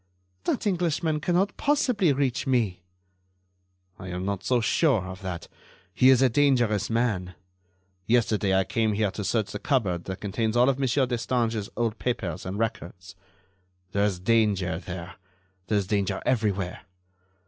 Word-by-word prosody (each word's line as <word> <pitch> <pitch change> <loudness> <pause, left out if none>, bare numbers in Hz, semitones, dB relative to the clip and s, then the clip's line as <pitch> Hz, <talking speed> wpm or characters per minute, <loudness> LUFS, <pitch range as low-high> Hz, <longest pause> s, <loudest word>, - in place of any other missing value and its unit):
"That - - -1
Englishman 170 -5 0
cannot 180 +5 0
possibly 250 - +2
reach 135 -1 0
me." 110 -9 +1 1.2
"I 95 - -8
am 90 +1 -4
not 100 -1 -2
so 125 +5 +2
sure 120 - +2
of 95 +1 -8
that. 90 -3 -5 0.5
He 130 - +5
is 130 0 +6
a - - +6
dangerous 120 -5 +2
man. 110 -6 -1 0.7
Yesterday 110 -4 +2
I 95 - +3
came 110 +3 0
here 105 -1 0
to 105 - -5
search 110 0 0
the 105 - -5
cupboard 100 - 0
that 95 -1 -5
contains 110 +3 -1
all 125 +2 +5
of 135 0 0
Monsieur 135 0 +2
Destange's 115 -3 -1
old 115 -2 -1
papers 95 -10 -3
and 95 +2 -4
records. 95 -4 -4 0.8
There 100 +2 +1
is 95 -4 -1
danger 95 -5 +1
there. 90 0 -8 0.5
There 105 - +1
is 100 - 0
danger 100 -1 0
everywhere. 100 -7 0
110 Hz, 150 wpm, -26 LUFS, 95-130 Hz, 1.2 s, is